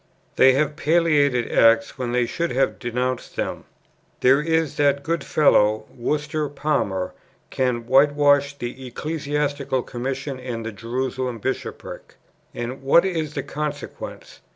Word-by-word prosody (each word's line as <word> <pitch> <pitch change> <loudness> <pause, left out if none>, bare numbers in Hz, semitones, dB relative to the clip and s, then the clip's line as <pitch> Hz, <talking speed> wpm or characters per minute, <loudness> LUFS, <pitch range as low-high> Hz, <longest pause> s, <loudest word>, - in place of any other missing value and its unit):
They 130 0 +6
have 150 +2 0
palliated 150 -7 +2
acts, 115 0 +4
when 125 -2 -2
they 125 0 +2
should 170 +8 -2
have 135 +1 +1
denounced 125 +1 -3
them. - - -3 0.6
There 135 +3 +5
is 160 -1 0
that 140 -1 +2
good 165 -2 -1
fellow, 110 -7 +3
Worcester 150 +4 -2
Palmer, 135 -11 -1 0.4
can 125 -3 -1
whitewash 145 +2 +4
the 125 +1 -6
Ecclesiastical 145 -1 -2
Commission 135 +2 -4
and 120 -3 -5
the 115 - -3
Jerusalem 125 +3 -3
Bishopric. 130 +5 -5 0.4
And 120 +3 -5
what 140 +7 +5
is 160 -5 -2
the - - -2
consequence? 150 0 -6
135 Hz, 130 wpm, -23 LUFS, 125-150 Hz, 0.6 s, They